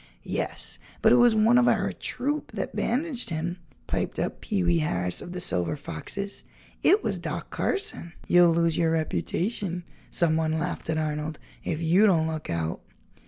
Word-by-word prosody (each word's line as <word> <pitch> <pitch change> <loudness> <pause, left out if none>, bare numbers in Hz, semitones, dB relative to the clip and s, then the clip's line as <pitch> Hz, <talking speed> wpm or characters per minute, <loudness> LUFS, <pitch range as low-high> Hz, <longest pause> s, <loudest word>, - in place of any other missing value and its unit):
"Yes, - - -3 0.2
but - - +6
it - - +7
was 240 -2 +6
one 225 +3 +5
of 245 - +4
our - - +2
troop 295 +3 -3
that - - -4
bandaged 255 -2 -1
him," 170 +2 -2 0.3
piped - - -2
up - - -2
Pee 200 -4 -1
wee 175 -1 +3
Harris 90 - 0
of 175 - -8
the 180 - -4
Silver 90 - +1
Foxes; 200 - -5 0.4
"it 415 +3 +5
was - - -1
Doc - - -5
Carson." 395 - -2
"You'll 175 -1 +6
lose 165 -1 +2
your 165 -1 +3
reputation," 175 +3 -1 0.3
someone 160 -1 +2
laughed 170 0 -3
at 160 - +1
Arnold, 155 0 -2 0.3
"if 165 0 -2
you 180 +7 +5
don't 165 -5 +3
look 160 -1 -4
out." 80 -1 -2
170 Hz, 165 wpm, -27 LUFS, 155-210 Hz, 0.4 s, it